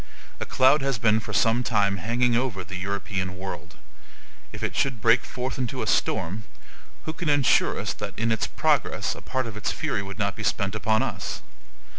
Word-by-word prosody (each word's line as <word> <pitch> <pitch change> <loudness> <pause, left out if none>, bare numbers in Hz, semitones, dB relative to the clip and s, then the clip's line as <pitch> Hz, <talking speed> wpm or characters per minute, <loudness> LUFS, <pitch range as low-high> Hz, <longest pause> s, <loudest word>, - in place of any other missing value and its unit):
A - - -4
cloud 135 +3 +5
has 135 -2 0
been 110 -1 +3
for 105 - -7
some 115 +4 +3
time 105 -5 +2
hanging 120 +5 +1
over 120 -6 0
the 90 +2 -8
European 95 -1 -3
world. 95 -2 -7 0.8
If - - -7
it - - -2
should 135 -4 +1
break 115 +2 +4
forth 130 +2 -4
into 125 -3 -2
a - - -2
storm, 95 +7 0 0.6
who 155 - -3
can 165 -1 -3
insure 145 -3 +3
us - - -2
that - - -6
in 115 +1 +1
its 110 - +1
progress - - +1
a - - -10
part 130 -1 -2
of 115 -3 -6
its 105 - -2
fury 150 -10 -2
would 100 0 -7
not 100 -2 0
be 110 - -6
spent 100 -1 0
upon 110 0 +2
us? - - -4
110 Hz, 195 wpm, -26 LUFS, 100-125 Hz, 0.8 s, cloud